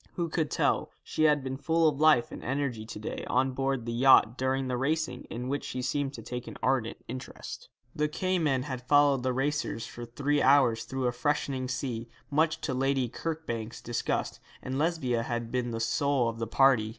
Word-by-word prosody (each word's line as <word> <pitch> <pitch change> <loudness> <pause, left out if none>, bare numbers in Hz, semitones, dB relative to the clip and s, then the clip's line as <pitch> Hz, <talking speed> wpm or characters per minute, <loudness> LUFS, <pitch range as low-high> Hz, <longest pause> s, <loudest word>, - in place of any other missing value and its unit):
Who 170 -2 -2
could 160 -1 0
tell? - - +1
She 155 - 0
had 150 -2 +4
been 130 0 -3
full 165 +3 +2
of 145 -2 0
life 155 -6 +5
and - - -8
energy 130 -4 -2
to - - -7
day 105 - -5
on 130 +1 +2
board 135 -2 -1
the 115 - -3
yacht 125 -2 +6
during 130 +1 0
the 125 - -1
racing, 145 0 -1
in 125 +2 -5
which 140 +2 -2
she 130 0 -4
seemed 140 +1 -1
to 115 - -9
take 125 +2 -6
an - - -8
ardent 125 -3 +1
interest. 125 +2 -8 0.3
The 150 0 +1
Cayman 155 -5 0
had 130 -2 -5
followed 145 -2 +5
the 130 +1 0
racers 135 -2 -1
for 120 - -8
three 145 +4 0
hours 130 -4 +4
through 130 -1 -3
a 125 - +2
freshening 130 0 -1
sea, 125 -2 -3 0.2
much 155 +2 +2
to 135 - -2
Lady 135 -1 +1
Kirkbank's 125 -6 -4
disgust, 120 - -2 0.2
and 130 +1 -3
Lesbia 145 -8 +1
had 120 0 -3
been 125 -1 -1
the 115 -1 -3
soul 125 +2 +1
of 115 0 -6
the 115 - -2
party. 125 -2 +4
130 Hz, 200 wpm, -29 LUFS, 120-145 Hz, 0.3 s, yacht